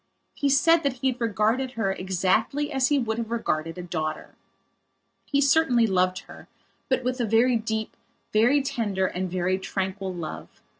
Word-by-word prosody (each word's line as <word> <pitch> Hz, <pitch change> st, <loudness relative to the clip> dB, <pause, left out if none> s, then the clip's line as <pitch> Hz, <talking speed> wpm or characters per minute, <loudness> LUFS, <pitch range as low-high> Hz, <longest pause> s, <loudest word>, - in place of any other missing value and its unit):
He 285 Hz, -, 0 dB
said 330 Hz, +5 st, +5 dB
that 280 Hz, -4 st, -1 dB
he 260 Hz, +1 st, 0 dB
had 245 Hz, 0 st, -10 dB
regarded 230 Hz, +4 st, 0 dB
her 215 Hz, -5 st, 0 dB
exactly 190 Hz, +10 st, 0 dB
as 265 Hz, -1 st, +2 dB
he 290 Hz, -, +2 dB
would 230 Hz, -3 st, -1 dB
have 225 Hz, -1 st, -4 dB
regarded 165 Hz, -8 st, -2 dB
a 180 Hz, -, -5 dB
daughter. 160 Hz, -3 st, -4 dB, 0.9 s
He 280 Hz, -, 0 dB
certainly 280 Hz, -5 st, +4 dB
loved 185 Hz, -2 st, +1 dB
her, -, -, -14 dB, 0.4 s
but 260 Hz, -1 st, +1 dB
with 255 Hz, 0 st, -1 dB
a -, -, +1 dB
very 230 Hz, +3 st, +3 dB
deep, 220 Hz, -1 st, -3 dB, 0.4 s
very 245 Hz, +7 st, +4 dB
tender 205 Hz, -8 st, -1 dB
and 185 Hz, 0 st, -3 dB
very 185 Hz, +1 st, 0 dB
tranquil 190 Hz, 0 st, -3 dB
love. 170 Hz, -4 st, -6 dB
225 Hz, 165 wpm, -25 LUFS, 190-255 Hz, 0.9 s, said